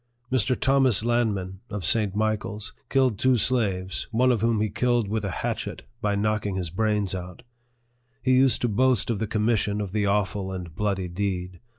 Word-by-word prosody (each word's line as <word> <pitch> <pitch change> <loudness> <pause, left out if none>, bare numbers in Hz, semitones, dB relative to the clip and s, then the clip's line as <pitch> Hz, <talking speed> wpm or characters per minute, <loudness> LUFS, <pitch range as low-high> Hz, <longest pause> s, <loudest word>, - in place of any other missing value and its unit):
Mr. 130 0 +1
Thomas 135 -5 +3
Lanman, 105 -6 0
of 105 -5 -4
St. 105 -2 +2
Michael's, 110 0 -2 0.2
killed 130 -6 +2
two 130 0 +4
slaves, 100 -6 0
one 125 +2 +3
of 120 - 0
whom 115 -1 +2
he 110 - +1
killed 120 -2 +1
with 110 +1 -2
a 100 - -2
hatchet, - - -4 0.2
by 105 -1 +1
knocking 105 -1 0
his 90 -4 -3
brains 105 0 0
out. 90 +2 -7 0.8
He 130 - +3
used 130 0 +4
to - - +3
boast 120 +1 +2
of 110 - -2
the 110 - -1
commission 105 -1 0
of 100 -3 -3
the 105 0 0
awful 100 -1 0
and 90 -4 -7
bloody 100 -1 -1
deed. 90 -1 -3
105 Hz, 180 wpm, -25 LUFS, 95-120 Hz, 0.8 s, two